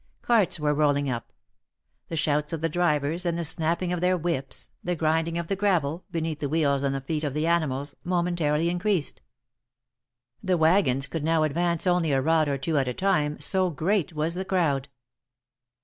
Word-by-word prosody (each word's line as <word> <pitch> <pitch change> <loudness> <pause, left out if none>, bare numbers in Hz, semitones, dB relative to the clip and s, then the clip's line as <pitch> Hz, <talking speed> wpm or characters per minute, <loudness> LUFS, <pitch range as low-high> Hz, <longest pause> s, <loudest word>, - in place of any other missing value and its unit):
Carts 220 -8 +2
were 150 0 +1
rolling 145 -2 +1
up. 120 -2 -5 0.8
The 165 - -5
shouts 150 0 0
of 160 - -3
the 165 - 0
drivers 160 0 0
and 170 -1 -1
the 170 - -2
snapping 165 +3 0
of 175 - -2
their 180 0 +2
whips, 165 -6 -4
the 180 0 -1
grinding 165 +1 0
of 170 - -2
the 195 - -1
gravel, 180 -5 0
beneath 165 -3 -3
the 145 - -2
wheels 145 -3 +1
and 135 -1 0
the 135 - -3
feet 155 +3 -3
of 145 -2 -2
the 155 +1 0
animals, 145 -4 0
momentarily 170 -3 0
increased. 175 -1 -1 1.2
The 185 -2 +1
wagons 160 -5 +3
could 150 +2 -4
now 160 0 +2
advance 170 +3 0
only 175 -4 +2
a 135 - +3
rod 155 +2 +2
or 140 - 0
two 150 +2 0
at 135 - -1
a 125 - -2
time, 150 -6 +1
so 185 -1 +1
great 170 +2 0
was 155 +1 -2
the 185 +2 -2
crowd. 160 -8 0
160 Hz, 185 wpm, -26 LUFS, 145-175 Hz, 1.2 s, wagons